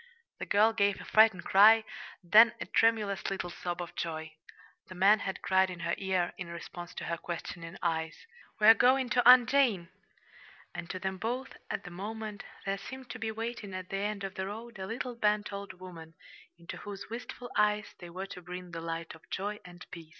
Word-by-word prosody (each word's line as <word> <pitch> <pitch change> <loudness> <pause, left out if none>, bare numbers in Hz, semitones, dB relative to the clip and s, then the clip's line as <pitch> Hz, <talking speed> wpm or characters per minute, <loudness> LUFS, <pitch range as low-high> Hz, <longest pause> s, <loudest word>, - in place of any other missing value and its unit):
The - - -5
girl 215 +2 +4
gave 200 -2 +1
a - - -9
frightened 215 -4 +5
cry, 220 +3 +7 0.4
then 220 +6 +7
a - - -4
tremulous 215 -4 +1
little 190 -2 -4
sob 175 0 -4
of 175 0 -11
joy. 160 -1 -4 0.5
The 185 - -10
man 200 +4 +5
had 190 -1 -5
cried 190 0 +3
in 175 -2 -7
her 170 0 -1
ear, 190 -2 0
in 185 - -5
response 170 +1 -8
to - - -5
her 170 - -2
questioning 170 0 -7
eyes: 160 -2 -2 0.3
"We're 215 +1 +9
going 255 +2 +3
to 245 -1 +5
Aunt 250 -1 +9
Jane!" 245 -11 +2 0.8
And 170 - -7
to 185 - -4
them 190 0 -4
both, 245 +5 -3
at - - -3
the 180 - -9
moment, 210 +3 -6 0.2
there 195 0 -1
seemed 260 +1 -9
to - - -7
be 220 0 -2
waiting 225 -3 -5
at 185 0 -6
the 195 - -2
end 205 0 -2
of 195 0 -4
the 190 0 -4
road 225 +1 -8
a 190 - -5
little 245 +3 -4
bent 210 -3 0
old 200 -1 -6
woman, 170 -3 -11 0.4
into 170 0 -8
whose 205 +1 -8
wistful 245 +1 -7
eyes 210 0 +1
they 175 - -9
were 185 +3 -5
to 195 -2 -9
bring 180 0 -8
the 165 -1 -6
light 165 0 -5
of 160 - -17
joy 205 +2 -3
and 175 0 -12
peace. 165 -3 -10
195 Hz, 200 wpm, -30 LUFS, 175-220 Hz, 0.8 s, We're